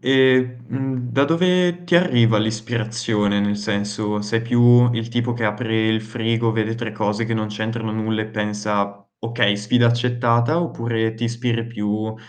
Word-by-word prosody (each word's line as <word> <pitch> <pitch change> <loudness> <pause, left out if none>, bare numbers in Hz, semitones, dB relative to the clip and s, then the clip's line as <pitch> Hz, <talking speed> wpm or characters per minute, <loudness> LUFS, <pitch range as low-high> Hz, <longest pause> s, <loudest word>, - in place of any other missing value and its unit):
E, 130 -1 +3
mhmm, 130 0 -3
da 140 - +3
dove 180 +2 +2
ti 175 0 0
arriva 120 -11 +3
l'ispirazione? 110 -1 -1
Nel 105 0 0
senso, 105 0 -2
sei 115 +2 -1
più 120 +1 +5
il 115 -1 -3
tipo 120 +1 -1
che 120 -1 -3
apre 110 +1 0
il 110 0 +1
frigo, 115 +1 -1
vede 110 0 -1
3 115 -2 -5
cose 105 +1 -1
che 115 0 -2
non 110 -1 -1
c'entrano 110 +1 -4
nulla 110 0 -1
e - - -6
pensa: 105 -1 -3 0.2
"Okay. 115 -3 +1
Sfida 115 +4 +2
accettata," 120 +5 +1
oppure 115 -8 -2
ti 115 +1 -4
ispiri 115 0 -2
più 110 -1 -3
115 Hz, 160 wpm, -21 LUFS, 110-120 Hz, 0.2 s, più